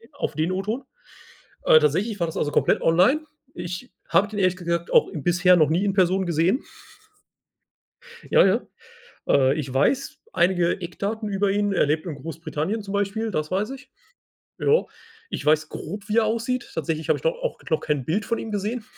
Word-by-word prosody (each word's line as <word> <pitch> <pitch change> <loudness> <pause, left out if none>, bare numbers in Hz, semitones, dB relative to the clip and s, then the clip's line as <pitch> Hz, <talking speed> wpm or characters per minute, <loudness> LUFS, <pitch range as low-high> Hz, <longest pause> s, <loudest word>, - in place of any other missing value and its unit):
auf 280 - -4
den 160 +3 0
O-Ton. 210 +8 -2 0.8
Äh, 155 - +7
tatsächlich 190 +9 0
war 170 - +1
das 160 - -6
also 145 - 0
komplett - - +2
online. 185 - +4 0.3
Ich 175 +8 -6 0.2
habe 200 - +4
den 205 0 -5
ehrlich 185 -1 +2
gesagt 170 -1 -2
auch - - +5
bisher 180 +3 +3
noch 155 -3 +4
nie 170 +5 +1
in 200 - +1
Person 190 0 +2
gesehen. 175 - +1 1.7
Ja, - - +6
ja. 200 +5 +3 0.7
Äh, 135 0 +4
ich 135 -3 -5
weiß 250 - +1
einige 175 0 +2
Eckdaten 205 +5 -4
über 200 0 +1
ihn. 205 0 +1
Er 180 - +3
lebt 155 +3 0
in 165 -4 -5
Großbritannien, 160 +7 -4
zum 200 0 -7
Beispiel, 205 +2 -1
das 155 -4 -2
weiß 200 +6 -1
ich. 270 0 -11 0.7
Ja, 455 +3 +3 0.4
ich - - -5
weiß 155 +1 +3
grob 200 +5 -7
wie 215 - +1
er 230 - +5
aussieht, 230 +3 -2
tatsächlich 160 -1 -3
habe - - +3
ich - - -13
doch - - +2
auch - - -3
noch 160 - +2
kein 150 -4 -1
Bild 195 - -1
von 230 - -1
ihm 225 - -6
gesehen. 210 +3 -2
185 Hz, 185 wpm, -24 LUFS, 160-215 Hz, 1.7 s, Äh